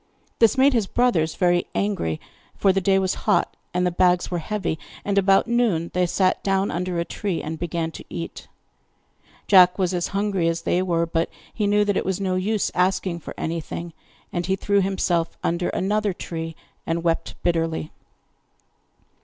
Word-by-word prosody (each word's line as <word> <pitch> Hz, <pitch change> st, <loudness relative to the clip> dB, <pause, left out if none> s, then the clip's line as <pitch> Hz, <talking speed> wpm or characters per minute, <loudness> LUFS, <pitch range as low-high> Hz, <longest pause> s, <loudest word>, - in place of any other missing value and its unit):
This 225 Hz, +2 st, +4 dB
made 270 Hz, +1 st, +5 dB
his 225 Hz, -5 st, +1 dB
brothers 185 Hz, -12 st, +1 dB
very 175 Hz, -1 st, +2 dB
angry, 195 Hz, -, -1 dB, 0.4 s
for 195 Hz, -2 st, +4 dB
the 195 Hz, -, +1 dB
day 195 Hz, +1 st, +3 dB
was 190 Hz, -1 st, +1 dB, 0.2 s
hot -, -, +2 dB, 0.2 s
and 180 Hz, 0 st, 0 dB
the 180 Hz, -, +1 dB
bags 180 Hz, 0 st, +2 dB
were 175 Hz, -, -1 dB
heavy, 170 Hz, -3 st, -3 dB, 0.3 s
and 200 Hz, -, 0 dB
about 195 Hz, 0 st, +4 dB
noon 225 Hz, -9 st, +1 dB
they 180 Hz, 0 st, +2 dB
sat 185 Hz, +1 st, +1 dB
down 195 Hz, 0 st, +1 dB
under 180 Hz, 0 st, -2 dB
a 170 Hz, -, 0 dB
tree 190 Hz, -3 st, -3 dB
and 160 Hz, +1 st, -5 dB
began 170 Hz, -1 st, -2 dB
to -, -, -9 dB
eat. 85 Hz, -1 st, -6 dB, 1.0 s
Jack 180 Hz, -2 st, +6 dB
was 185 Hz, -2 st, 0 dB
as 175 Hz, -1 st, 0 dB
hungry 195 Hz, -3 st, 0 dB
as 165 Hz, 0 st, -1 dB
they 180 Hz, -, +1 dB
were, 170 Hz, -2 st, +1 dB
but 165 Hz, 0 st, -1 dB, 0.2 s
he 210 Hz, -2 st, 0 dB
knew 205 Hz, 0 st, +3 dB
that 205 Hz, -1 st, +1 dB
it -, -, 0 dB
was 190 Hz, 0 st, -2 dB
no 190 Hz, -2 st, -1 dB
use 200 Hz, +3 st, 0 dB
asking 180 Hz, -1 st, +1 dB
for -, -, -9 dB
anything; 165 Hz, +1 st, -4 dB, 0.4 s
and 175 Hz, 0 st, -2 dB
he 190 Hz, -, +2 dB
threw 200 Hz, +1 st, +1 dB
himself 180 Hz, -3 st, 0 dB
under 175 Hz, +1 st, 0 dB
another 205 Hz, +1 st, 0 dB
tree, 165 Hz, -2 st, -6 dB, 0.3 s
and 165 Hz, +1 st, -1 dB
wept 165 Hz, -1 st, -1 dB
bitterly. 165 Hz, -2 st, 0 dB
180 Hz, 180 wpm, -23 LUFS, 170-195 Hz, 1.0 s, Jack